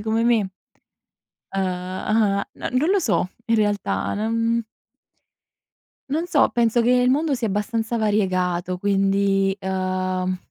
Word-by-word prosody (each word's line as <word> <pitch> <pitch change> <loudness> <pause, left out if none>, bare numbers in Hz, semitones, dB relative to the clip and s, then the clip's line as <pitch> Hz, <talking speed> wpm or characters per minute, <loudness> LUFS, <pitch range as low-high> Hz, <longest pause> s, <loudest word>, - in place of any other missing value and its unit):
come 220 +2 0
me? 225 -5 +2 1.0
Uhm 185 -1 -3
uhm, 210 -2 +2
no - - -5
non 270 +7 +1
lo 400 - +4
so 220 - 0 0.2
in 230 -1 +2
realtà, 205 -2 0
non 230 +2 0 1.5
non 320 +5 -1
so - - +3
penso 235 0 +2
che 235 - +2
il 250 0 +4
mondo 300 +3 +1
sia 240 -3 -2
abbastanza 220 +3 -1
variegato, 185 -4 0
quindi, 195 0 +1
uhm, 185 -1 -1
210 Hz, 125 wpm, -22 LUFS, 190-230 Hz, 1.5 s, lo